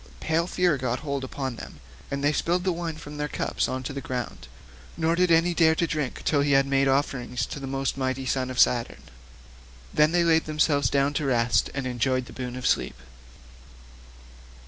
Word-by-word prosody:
Pale 165 Hz, +2 st, 0 dB
fear 180 Hz, -5 st, +2 dB
got 125 Hz, -1 st, -2 dB
hold 140 Hz, -3 st, -3 dB
upon 130 Hz, -2 st, -4 dB
them, -, -, -10 dB, 0.3 s
and 140 Hz, 0 st, -3 dB
they 145 Hz, +1 st, +3 dB
spilled 175 Hz, +4 st, 0 dB
the 185 Hz, -, +1 dB
wine 170 Hz, -2 st, -4 dB
from 150 Hz, -1 st, -9 dB
their 150 Hz, 0 st, -2 dB
cups -, -, -1 dB
on 130 Hz, 0 st, -3 dB
to 135 Hz, -, -5 dB
the 140 Hz, -, -5 dB
ground, 125 Hz, -2 st, -5 dB, 0.5 s
nor 165 Hz, 0 st, +1 dB
did 180 Hz, 0 st, +2 dB
any 165 Hz, +1 st, +4 dB
dare 160 Hz, -1 st, +4 dB
drink 155 Hz, -5 st, -2 dB
till 145 Hz, -2 st, +3 dB
he 140 Hz, 0 st, +2 dB
had 135 Hz, 0 st, +5 dB
made 135 Hz, 0 st, +2 dB
offerings 135 Hz, -2 st, 0 dB
to -, -, -7 dB
the 135 Hz, -, -6 dB
most 135 Hz, 0 st, -2 dB
mighty 130 Hz, 0 st, -1 dB
son 130 Hz, 0 st, -1 dB
of 130 Hz, -, -6 dB
Saturn. 120 Hz, -2 st, +2 dB, 0.9 s
Then 150 Hz, +1 st, +4 dB
they 175 Hz, 0 st, +3 dB
laid 160 Hz, -1 st, +3 dB
themselves 150 Hz, -4 st, +2 dB
down 140 Hz, +1 st, +1 dB
to 150 Hz, -, -1 dB
rest 115 Hz, -2 st, +2 dB
and 135 Hz, -2 st, -2 dB
enjoyed 130 Hz, +1 st, 0 dB
the -, -, -12 dB
boon 125 Hz, -1 st, -5 dB
of 125 Hz, -, -6 dB
sleep. -, -, 0 dB
140 Hz, 195 wpm, -26 LUFS, 130-160 Hz, 0.9 s, had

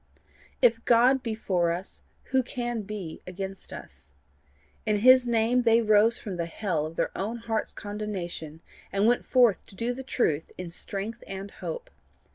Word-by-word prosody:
If 230 Hz, -1 st, +4 dB
God 250 Hz, +3 st, +5 dB
be 230 Hz, -3 st, -3 dB
for 175 Hz, -5 st, +1 dB
us 180 Hz, +3 st, -6 dB, 0.3 s
who 265 Hz, 0 st, +4 dB
can 240 Hz, -2 st, -3 dB
be 200 Hz, -5 st, -7 dB
against 190 Hz, +1 st, -6 dB
us? 70 Hz, 0 st, -11 dB, 0.7 s
In 210 Hz, -2 st, +1 dB
his 255 Hz, +1 st, +7 dB
name 235 Hz, +1 st, +3 dB
they 230 Hz, -1 st, +5 dB
rose 215 Hz, 0 st, +5 dB
from 195 Hz, -4 st, -6 dB
the 170 Hz, -1 st, -2 dB
hell 165 Hz, -4 st, -2 dB
of 160 Hz, -, -10 dB
their -, -, -1 dB
own 220 Hz, +5 st, -2 dB
hearts' 225 Hz, -1 st, -2 dB
condemnation, 190 Hz, -7 st, -5 dB, 0.3 s
and 200 Hz, +1 st, +2 dB
went 240 Hz, +2 st, +2 dB
forth 245 Hz, -6 st, +4 dB
to -, -, -15 dB
do 235 Hz, +5 st, -1 dB
the 260 Hz, -, -6 dB
truth 165 Hz, -, 0 dB
in 180 Hz, -2 st, -6 dB
strength 210 Hz, +6 st, -5 dB
and 195 Hz, +1 st, -6 dB
hope. 170 Hz, -3 st, -6 dB
210 Hz, 165 wpm, -27 LUFS, 180-235 Hz, 0.7 s, his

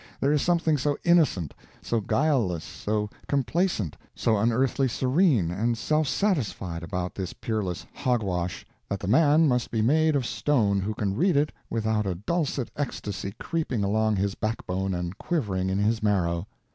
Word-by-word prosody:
There 140 Hz, +2 st, +2 dB
is 150 Hz, -, +2 dB
something 165 Hz, -4 st, +2 dB
so 145 Hz, +2 st, 0 dB
innocent, 150 Hz, -, +3 dB, 0.3 s
so 115 Hz, -1 st, -1 dB
guileless, 115 Hz, -, +1 dB
so 105 Hz, 0 st, -2 dB, 0.2 s
complacent, 140 Hz, -, 0 dB, 0.2 s
so 115 Hz, -, +2 dB
unearthly 120 Hz, +5 st, +2 dB
serene 130 Hz, -, +2 dB
and 115 Hz, +6 st, 0 dB
self 155 Hz, +5 st, +1 dB
satisfied 120 Hz, -, -1 dB
about 90 Hz, 0 st, -3 dB
this 95 Hz, -2 st, -5 dB
peerless 105 Hz, -6 st, -3 dB
"hog 125 Hz, -4 st, 0 dB
wash," 90 Hz, -2 st, -3 dB, 0.2 s
that 100 Hz, -, -2 dB
the 95 Hz, -, -5 dB
man 150 Hz, +7 st, +5 dB
must 125 Hz, -3 st, +1 dB
be 110 Hz, -2 st, 0 dB
made 155 Hz, +5 st, +3 dB
of 135 Hz, -3 st, +1 dB
stone 115 Hz, -6 st, +1 dB
who 105 Hz, +3 st, -2 dB
can 100 Hz, -2 st, -1 dB
read 175 Hz, -, +2 dB
it 150 Hz, +1 st, +2 dB, 0.2 s
without 110 Hz, -2 st, 0 dB
a 90 Hz, -, -1 dB
dulcet 140 Hz, -, -2 dB
ecstasy 100 Hz, -8 st, -4 dB
creeping 150 Hz, -10 st, -2 dB
along 110 Hz, +2 st, +2 dB
his 100 Hz, 0 st, 0 dB
backbone 95 Hz, -4 st, -2 dB
and 90 Hz, +1 st, -4 dB
quivering 95 Hz, -, -1 dB
in 95 Hz, -, 0 dB
his 110 Hz, +3 st, +1 dB
marrow. 90 Hz, -4 st, +1 dB
110 Hz, 160 wpm, -26 LUFS, 95-145 Hz, 0.3 s, man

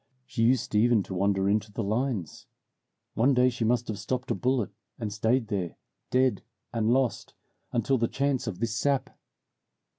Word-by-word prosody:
She 115 Hz, -, -3 dB
used 125 Hz, -2 st, +2 dB
even 110 Hz, 0 st, +4 dB
to 95 Hz, -, -7 dB
wander 95 Hz, +1 st, +1 dB
in 105 Hz, +2 st, +3 dB
the 115 Hz, -, -1 dB
lines. 110 Hz, -, -2 dB, 0.7 s
One 130 Hz, +4 st, +3 dB
day 125 Hz, +1 st, +4 dB
she 120 Hz, -1 st, -3 dB
must 120 Hz, +1 st, +1 dB
have 105 Hz, -3 st, -4 dB
stopped 125 Hz, +4 st, -3 dB
a -, -, +4 dB
bullet, 125 Hz, -5 st, 0 dB, 0.3 s
and 105 Hz, -3 st, -4 dB
stayed 110 Hz, +2 st, +1 dB
there, 95 Hz, -6 st, -2 dB, 0.3 s
dead 130 Hz, 0 st, +2 dB, 0.3 s
and 115 Hz, -1 st, +1 dB
lost, 130 Hz, -1 st, 0 dB, 0.4 s
until 120 Hz, +3 st, +1 dB
the 115 Hz, -, +2 dB
chance 135 Hz, -1 st, -1 dB
of 100 Hz, -5 st, -3 dB
this 115 Hz, +1 st, -2 dB
sap. 140 Hz, +2 st, 0 dB
115 Hz, 170 wpm, -28 LUFS, 105-130 Hz, 0.7 s, even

